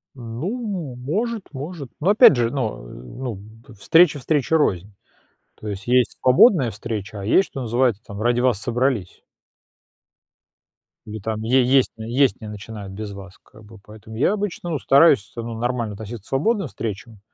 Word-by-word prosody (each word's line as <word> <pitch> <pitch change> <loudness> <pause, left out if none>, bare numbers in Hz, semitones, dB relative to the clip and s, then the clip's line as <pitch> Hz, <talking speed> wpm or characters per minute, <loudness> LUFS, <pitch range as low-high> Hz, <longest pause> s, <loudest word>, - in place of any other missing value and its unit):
Ну, 165 - -5
может 200 - -3
может, 145 0 -7
но 175 +6 +1
опять 215 - +7
же, 120 -1 0
но, 125 - -3
э, - - -12
ну, 115 - -7
б 110 +5 -15
встреча 160 - +4
встрече 150 +3 0
рознь, 100 - 0 0.6
то 110 - -7
есть 100 +3 -7
есть 125 0 +2
свободная 130 - +5
встреча, 105 -1 -6
а - - -7
есть, 185 - +3
что 135 - -6
называется 120 -2 0
там 100 +1 -8
"ради 120 +1 +2
вас 125 -5 +2
собрались". 120 -5 -2 1.8
Ну, 110 +1 -7
там 110 +1 -4
е 130 +3 +3
есть 130 +1 +3
есть 120 +4 +1
не 110 - -7
начинают 105 -1 -8
без 105 0 -6
вас, 95 -1 -11
как 110 - -18
бы, 110 +1 -14
поэтому 110 +1 -13
я 135 - +2
обычно 180 -5 -3
стараюсь, 135 -7 +4
ну, 115 0 -5
нормально 120 -3 -2
относиться 110 0 -8
к - - -19
свободным 195 - 0
встречам, 110 0 -7
120 Hz, 165 wpm, -22 LUFS, 110-140 Hz, 1.8 s, опять